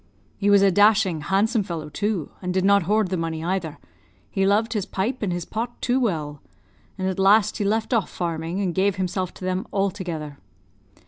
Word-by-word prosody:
He 205 Hz, -, 0 dB
was 200 Hz, -1 st, +6 dB
a 195 Hz, -, +5 dB
dashing, 205 Hz, -4 st, +4 dB
handsome 210 Hz, +8 st, +1 dB
fellow, 165 Hz, -5 st, -5 dB
too, 195 Hz, +2 st, -2 dB
and 180 Hz, -1 st, -2 dB
did 185 Hz, +1 st, +1 dB
not 200 Hz, 0 st, +5 dB
hoard 210 Hz, -2 st, +2 dB
the 185 Hz, -, -1 dB
money, 165 Hz, -1 st, -3 dB
either; 175 Hz, -3 st, -2 dB, 0.5 s
he 195 Hz, 0 st, +1 dB
loved 220 Hz, +3 st, +2 dB
his 205 Hz, -4 st, -2 dB
pipe 235 Hz, +7 st, -2 dB
and 205 Hz, -4 st, -1 dB
his 175 Hz, -1 st, -3 dB
pot 235 Hz, +2 st, -4 dB
too 250 Hz, +2 st, +1 dB
well; 155 Hz, -, -2 dB, 0.6 s
and 185 Hz, -1 st, -2 dB
at 190 Hz, 0 st, -2 dB
last 205 Hz, +2 st, +4 dB
he -, -, 0 dB
left 220 Hz, +4 st, 0 dB
off 225 Hz, -5 st, +1 dB
farming, 170 Hz, +2 st, -3 dB
and 185 Hz, -3 st, -1 dB
gave 195 Hz, +1 st, +1 dB
himself 185 Hz, -1 st, -2 dB
to 185 Hz, -, -8 dB
them 185 Hz, 0 st, -2 dB
altogether. 175 Hz, -7 st, -3 dB
190 Hz, 195 wpm, -23 LUFS, 175-210 Hz, 0.6 s, was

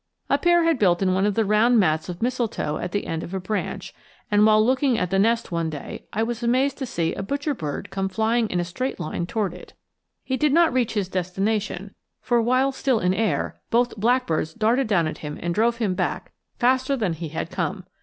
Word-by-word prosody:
A -, -, +3 dB
pair 345 Hz, -1 st, +4 dB
had 330 Hz, -5 st, +2 dB
built 180 Hz, -2 st, +3 dB
in 185 Hz, -1 st, +2 dB
one 190 Hz, +2 st, +2 dB
of 205 Hz, -, 0 dB
the 225 Hz, -, +2 dB
round 220 Hz, +4 st, +4 dB
mats 160 Hz, -3 st, +1 dB
of 175 Hz, +4 st, -5 dB
mistletoe 235 Hz, -11 st, -1 dB
at -, -, -4 dB
the 205 Hz, -, -2 dB
end 165 Hz, 0 st, -3 dB
of 180 Hz, -, -6 dB
a -, -, -1 dB
branch, 200 Hz, +3 st, -4 dB, 0.4 s
and 205 Hz, 0 st, +5 dB
while 215 Hz, 0 st, +5 dB
looking 260 Hz, 0 st, +2 dB
at 180 Hz, -3 st, -1 dB
the 195 Hz, -, +2 dB
nest 230 Hz, +2 st, +1 dB
one 165 Hz, -1 st, -1 dB
day 150 Hz, -3 st, -7 dB
I 220 Hz, -, 0 dB
was 235 Hz, +1 st, -3 dB
amazed 255 Hz, +4 st, +1 dB
to 265 Hz, -, -3 dB
see 165 Hz, -6 st, -1 dB
a -, -, -4 dB
butcherbird 260 Hz, -, -3 dB
come 195 Hz, 0 st, -2 dB
flying 220 Hz, +3 st, +1 dB
in 180 Hz, -, -1 dB
a 175 Hz, -, -1 dB
straight 255 Hz, +10 st, -4 dB
line 170 Hz, +2 st, -3 dB
toward 200 Hz, -3 st, -1 dB
it. 180 Hz, -, -12 dB, 0.5 s
He 260 Hz, -, -2 dB
did 300 Hz, -1 st, +2 dB
not 335 Hz, -3 st, +4 dB
reach 245 Hz, -3 st, 0 dB
his 200 Hz, -3 st, 0 dB
destination, 195 Hz, +2 st, -2 dB, 0.3 s
for 240 Hz, -1 st, +1 dB
while 255 Hz, +4 st, +2 dB
still 265 Hz, -3 st, 0 dB
in 180 Hz, -1 st, +1 dB
air 190 Hz, -7 st, -1 dB
both 240 Hz, +1 st, +2 dB
blackbirds 220 Hz, -8 st, 0 dB
darted 230 Hz, +3 st, +2 dB
down 185 Hz, -6 st, +2 dB
at 155 Hz, -, -4 dB
him 150 Hz, -1 st, -6 dB
and 175 Hz, 0 st, -2 dB
drove 230 Hz, +4 st, +2 dB
him 215 Hz, -5 st, 0 dB
back -, -, -3 dB, 0.3 s
faster 260 Hz, +2 st, +2 dB
than 205 Hz, -8 st, 0 dB
he 165 Hz, 0 st, -6 dB
had 160 Hz, -, -4 dB
come. -, -, -3 dB
215 Hz, 225 wpm, -24 LUFS, 180-245 Hz, 0.5 s, and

